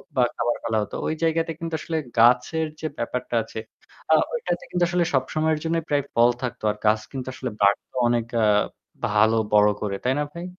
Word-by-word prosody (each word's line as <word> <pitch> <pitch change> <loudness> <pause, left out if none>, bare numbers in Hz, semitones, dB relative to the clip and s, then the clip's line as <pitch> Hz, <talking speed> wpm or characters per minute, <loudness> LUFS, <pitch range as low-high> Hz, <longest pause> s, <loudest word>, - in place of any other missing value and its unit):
বা 130 - +3
খাবার 120 0 0
ফেলা 110 -1 0
হতো - - -8
ওই 155 - 0
জায়গাতে 165 0 +1
কিন্তু 165 -1 -3
আসলে 165 -1 -3 0.2
গাছের 125 +7 +4
যে 155 - -2
ব্যাপারটা - - -3
আছে - - -7 0.5
আ - - +8 0.2
ঐটাতে 310 - -2
কিন্তু 180 -1 +1
আসলে 175 -1 +1
সবসময়ের 155 +4 +1
জন্যই 165 0 0
প্রায় 145 -1 +2
ফল 120 +1 +5
থাকতো। 125 - -4
আর 105 - -8
গাছ 105 0 +4
কিন্তু 130 -2 -6
আসলে 130 -1 -4
বাড়তো 100 +5 +2
অনেক 120 -1 +1 0.2
আ - - +5 0.6
ভালো 110 +2 +3 0.2
বড় 105 0 +6
করে। 100 -2 -2
তাই 130 - +2
না 150 - +1
ভাই? 170 +1 -6
130 Hz, 195 wpm, -24 LUFS, 115-160 Hz, 0.6 s, আ